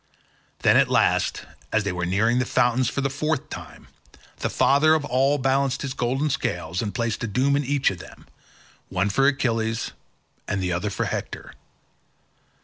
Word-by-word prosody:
Then, - - +5
at - - +4
last, - - +1 0.3
as 110 -1 +2
they 100 - -1
were 90 -1 -2
nearing 110 +6 +2
the 130 - +1
fountains 125 0 +2
for 140 - -2
the 140 - 0
fourth 150 0 -2
time, - - -9 0.5
the - - -2
father 155 +3 +4
of 155 -2 -1
all 135 +2 +2
balanced 135 0 0
his 135 -1 -3
golden 135 +4 -1
scales 85 -9 -2
and 105 -3 -4
placed 115 -3 -2
a - - -1
doom 130 +7 +1
in 145 - +1
each 140 -2 +1
of 90 - -8
them, - - -13 0.6
one 95 +2 0
for 135 +6 +3
Achilles 115 -5 0 0.6
and 100 - -1
the 90 -1 -1
other 90 +4 -1
for - - -2
Hector. - - -5
125 Hz, 175 wpm, -24 LUFS, 105-140 Hz, 0.6 s, Then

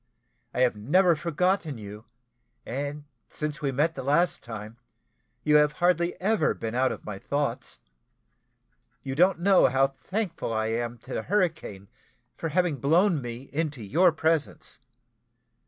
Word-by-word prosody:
I - - -2
have 125 -3 +3
never 170 - +3
forgotten 170 -1 0
you, 105 +1 -10 0.6
and 145 +3 -4 0.3
since 150 -1 -4
we 140 -2 0
met 150 +5 +1
the 135 - -6
last 150 +7 +1
time, 110 -1 -8 0.7
you 150 0 +5
have 150 0 +3
hardly 175 +1 +1
ever 215 +4 +1
been 110 0 -5
out 130 +1 +2
of - - -8
my 100 -2 -6
thoughts. 140 -2 -3 1.2
You 135 - -4
don't 180 +5 +4
know 195 -3 +5
how 135 +1 +3
thankful 170 - -4
I 110 0 -1
am 120 +1 -2
to - - -10
the - - -1
hurricane 160 - -1 0.5
for 165 - -4
having 170 -2 +1
blown 165 - +3
me 120 +2 -7
into 145 -5 -2
your 170 - +4
presence. 160 -1 -1
145 Hz, 145 wpm, -27 LUFS, 120-170 Hz, 1.2 s, you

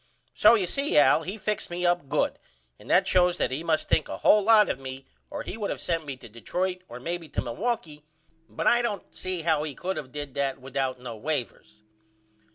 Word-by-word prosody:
So 215 +2 +6
you 200 -5 +1
see 280 +11 0
Al 145 +2 +6
he 190 +6 -5
fixed 210 0 -2
me 175 +1 -2
up 175 -5 +1
good - - 0 0.4
and - - -14
that - - +5
shows 180 -1 +3
that - - 0
he 140 +5 -3
must 160 -2 0
think 155 - +1
a - - -4
hole 210 - +5
lot 215 0 +6
of - - -2
me 135 0 -7 0.2
or - - -5
he - - -6
would 210 -2 -3
of - - -3
sent 165 -3 -2
me 135 -2 -5
to 125 - -12
Detroit 180 - -3
or 120 - -8
maybe 170 +3 -5
to - - -3
Milwaukee 155 - -3 0.5
but - - -4
I 240 - +5
don't 210 -5 -4
see 185 -3 -3
how 160 -2 +2
he 150 -3 -4
could 190 +6 -3
of 130 -3 -9
did 145 -1 -6
that 140 -1 -1
without 130 -1 -3
no 125 -2 -7
wavers. 110 -4 -5
160 Hz, 220 wpm, -27 LUFS, 135-185 Hz, 0.5 s, So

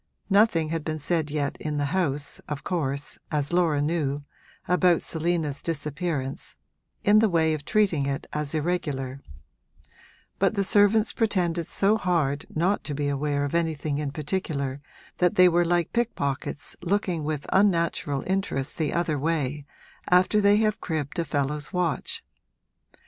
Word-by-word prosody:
Nothing 195 -6 +4
had 165 -1 -2
been 155 0 -3
said 155 0 -1
yet 145 -1 -2
in 150 -1 -3
the 145 - +1
house, 145 -6 -1
of 150 -2 -4
course, 145 -5 -2
as 150 +1 -1
Laura 165 -5 +2
knew, 145 -3 -1 0.4
about 180 -1 +3
Selina's 160 -3 -1
disappearance, 150 -3 -3 0.5
in 210 +1 +6
the 220 -1 +4
way 160 -2 +2
of 150 -2 -4
treating 190 -10 +2
it 140 -1 -3
as 150 0 -1
irregular; 145 -5 -2 1.2
but - - +2
the 200 - +1
servants 205 +2 +4
pretended 175 -7 0
so 205 +2 +2
hard 160 -8 0
not 180 +6 0
to 145 - -3
be 145 0 -1
aware 145 0 0
of 145 - -4
anything 155 -3 0
in 150 -2 -2
particular 145 -3 -3 0.4
that 180 -1 +3
they 180 0 +7
were 175 0 +3
like 175 -1 0
pickpockets 145 - -2
looking 180 -3 0
with 150 -1 -3
unnatural 170 -7 +2
interest 185 -8 -2
the 155 -2 0
other 165 -4 0
way 145 -2 -1 0.4
after 185 +4 +4
they 200 0 +5
have 215 -1 +1
cribbed 155 -2 -3
a 170 - 0
fellow's 145 0 -2
watch. 180 -3 -1
160 Hz, 150 wpm, -26 LUFS, 145-180 Hz, 1.2 s, they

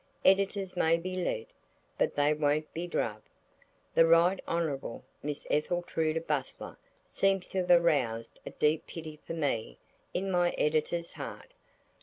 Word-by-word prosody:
Editors 195 0 +3
may 165 -1 +3
be 185 +2 -5
led, 175 -11 -1 0.5
but - - 0
they 145 +1 +3
won't 150 0 0
be 170 +2 -3
druv. 110 -9 -1 0.7
The 165 - +6
Right 170 +3 +5
Honourable 155 -8 -2 0.2
Miss 145 0 -4
Etheltruda 160 0 0
Bustler 145 -4 -3 0.3
seems 195 -2 +1
to 190 - -1
have - - -8
aroused 140 -10 +3
a - - -6
deep 150 +1 +1
pity 155 -2 -8
for - - -3
me 115 - -1 0.3
in 190 +1 -2
my 175 -1 +2
Editor's 155 +3 0
heart. - - -8
165 Hz, 140 wpm, -30 LUFS, 150-175 Hz, 0.7 s, The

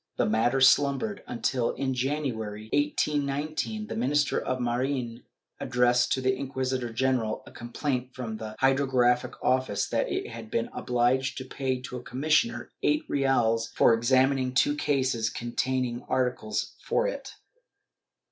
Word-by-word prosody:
The - - +2
matter 115 +5 +2
slumbered 140 +10 +3
until, 120 +1 -1
in 135 -1 -2
January, 120 -6 -3
1819, 150 +7 -1
the - - -6
Minister 140 +4 +1
of 130 0 -2
Marine 120 0 -2 0.4
addressed 125 -1 +2
to 130 - -1
the 130 0 +2
inquisitor 130 -2 -3
general 115 -2 0
a - - -13
complaint 125 +1 -3
from 115 -4 -5
the 110 0 -7
Hydrographic 130 -2 +2
Office 130 -5 +1
that - - 0
it - - -2
had 115 -1 -8
been 115 - -1
obliged 125 +2 +1
to 130 - -5
pay 130 -1 -2
to 125 - -6
a 125 - -9
commissioner 125 -3 0
eight 150 0 +2
reales 115 -5 +1
for - - +5
examining 130 +2 +2
two 145 +3 +3
cases 130 -6 0
containing 120 0 -2
articles 125 -4 -1
for 480 - +1
it. - - -6
130 Hz, 140 wpm, -27 LUFS, 120-135 Hz, 0.4 s, for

